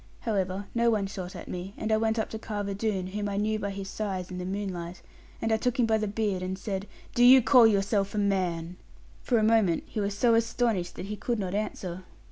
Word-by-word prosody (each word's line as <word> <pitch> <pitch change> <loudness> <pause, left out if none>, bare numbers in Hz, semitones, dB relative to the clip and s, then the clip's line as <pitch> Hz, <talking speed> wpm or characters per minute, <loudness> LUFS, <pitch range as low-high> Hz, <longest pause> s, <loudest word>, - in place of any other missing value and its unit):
However, 195 -3 -1
no 235 0 +3
one 210 -3 +1
shot 190 -2 -6
at - - -8
me; 185 +2 -6
and 220 - -2
I 220 - +4
went 220 +1 +1
up 220 - 0
to 220 - -5
Carver 205 -2 -3
Doone, 200 -2 -1
whom 205 +2 -3
I 200 - -3
knew 215 +1 0
by 200 -1 -2
his 195 0 -5
size 195 -3 -4
in 180 - -5
the 180 - -4
moonlight, 185 -3 -4 0.4
and 225 - -1
I 220 - +4
took 250 +2 -1
him 240 - +5
by 220 -1 +2
the 215 - -1
beard, 205 -2 -1
and 185 +1 -3
said, 195 -1 -4 0.3
'Do 245 - +3
you 255 +2 +9
call 245 -1 +7
yourself 200 -1 +1
a - - -2
man?' 180 -4 0 0.4
For 245 - +1
a 220 - +2
moment 215 -6 +3
he - - -5
was 200 0 -2
so 235 +1 +4
astonished 225 -5 +1
that 180 - -6
he 210 +1 -4
could 235 +3 -2
not 190 -3 -3
answer. 185 -3 -3
205 Hz, 240 wpm, -28 LUFS, 190-220 Hz, 0.4 s, you